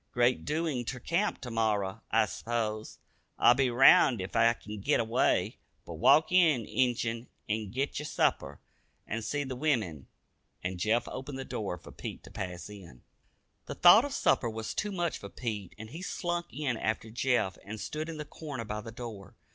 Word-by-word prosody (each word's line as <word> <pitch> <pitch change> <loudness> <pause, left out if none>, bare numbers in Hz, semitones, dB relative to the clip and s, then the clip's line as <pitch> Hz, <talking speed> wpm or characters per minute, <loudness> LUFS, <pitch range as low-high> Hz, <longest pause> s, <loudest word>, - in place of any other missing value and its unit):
Great 120 +1 +2
doin's 150 -5 -1
ter 130 - -3
camp 170 - -1
ter 125 -2 -7
morrer, 105 -4 0
I - - +4
s'pose. 110 -2 -3 0.4
I'll 120 - +7
be 130 0 +2
round 120 -1 +6
ef 95 +1 -6
I 115 - +5
kin 105 -2 -8
git - - +2
away, 115 +2 +1 0.3
but 85 - -7
walk 155 - +5
in, 160 -10 +4
Injun, 120 -1 0 0.2
an' 110 -1 -2
git 135 +8 -2
yer 150 - -5
supper, - - 0 0.5
an' 115 +2 -3
see 145 +6 -2
the 130 -2 -5
wimmin," 110 - -1 0.6
and 90 0 -3
Jeff 115 +5 +1
opened 135 +1 -6
the 135 - -5
door 100 -4 -4
for - - -13
Pete - - -7
to - - -13
pass 90 -2 -5
in. 90 -12 -12 0.6
The - - -5
thought 180 +7 +8
of 285 - -4
supper 120 - +2
was 110 0 -5
too 210 - -2
much 175 -3 -2
for 100 - -8
Pete 105 -5 -5
and 110 +1 -9
he 165 - -7
slunk 175 -1 -2
in 135 -3 -2
after 110 0 -2
Jeff 120 -5 0
and 110 +2 -7
stood 155 +7 -4
in 165 - -6
the 150 - -5
corner 140 -7 -7
by 105 0 -4
the 115 +1 -8
door. 110 -5 -9
120 Hz, 185 wpm, -30 LUFS, 105-145 Hz, 0.6 s, thought